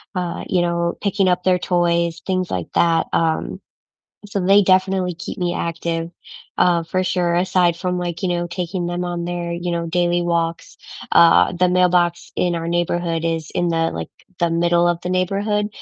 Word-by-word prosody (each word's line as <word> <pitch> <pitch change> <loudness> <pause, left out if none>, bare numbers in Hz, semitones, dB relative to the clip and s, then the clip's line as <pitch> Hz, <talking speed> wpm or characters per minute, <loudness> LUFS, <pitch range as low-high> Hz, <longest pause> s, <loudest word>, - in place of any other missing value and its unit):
uh, 180 -2 -3
you 180 - +1
know, 170 0 0
picking 200 -1 +1
up 180 0 0
their 185 0 +3
toys, 170 -1 0
things 185 -2 -1
like 90 -2 -3
that. 165 -1 +3
Um, 160 -1 0 0.7
so 200 -1 -3
they 195 +2 +6
definitely 185 -1 +2
keep 170 - -7
me 175 -1 -1
active, 165 0 -3 0.5
uh, 175 -2 +3
for 185 +3 -1
sure, 175 -2 0
aside 180 -1 +2
from, 180 0 -2
like, 175 0 -4
you 185 - 0
know, 175 0 -1
taking 175 +1 -4
them 175 +1 -3
on 175 -1 -3
their, 175 -1 -4
you 175 +1 -3
know, 170 0 -2
daily 175 +1 +1
walks. 170 -1 -2 0.3
Uh, 170 +1 +5
the 180 +1 +2
mailbox 180 -1 +2
in 175 -1 +1
our 165 0 -3
neighborhood 175 -1 -1
is 165 -2 -2
in 175 - +1
the, 165 -1 0
like 80 0 -5 0.3
the 170 -1 +1
middle 170 +1 +2
of 175 -1 0
the 180 - -4
neighborhood. 200 +3 0
175 Hz, 180 wpm, -20 LUFS, 170-180 Hz, 0.7 s, they